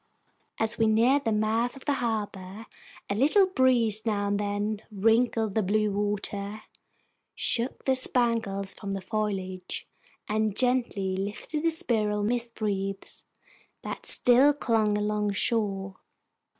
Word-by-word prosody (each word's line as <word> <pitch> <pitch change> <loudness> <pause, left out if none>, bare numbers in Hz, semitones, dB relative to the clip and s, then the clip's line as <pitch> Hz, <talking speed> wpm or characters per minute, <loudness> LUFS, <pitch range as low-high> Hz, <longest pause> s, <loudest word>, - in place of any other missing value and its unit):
As 225 +1 0
we 225 - +4
neared 245 +6 +3
the 225 - +1
mouth 220 +3 0
of 270 - -13
the 290 - +2
harbor 210 -2 -4 0.4
a - - -1
little 300 - +4
breeze 245 - +2
now 205 -3 0
and 200 0 0
then 205 +1 -2
wrinkled 225 +1 +2
the 220 - +2
blue 210 +2 +1
water, 205 +1 -3 0.7
shook 240 +3 -1
the 265 - +3
spangles 230 -6 +1
from 200 -2 -6
the 195 - -3
foliage, 190 -2 -4 0.4
and 215 -1 0
gently 240 -7 +1
lifted 205 +10 -4
the 330 - +2
spiral 220 - -1
mist 235 +1 -2
wreaths 195 -2 -3 0.6
that - - -6
still 260 +4 +5
clung 220 -6 +1
along 210 0 -1
shore. 195 -3 -1
215 Hz, 130 wpm, -27 LUFS, 200-235 Hz, 0.7 s, still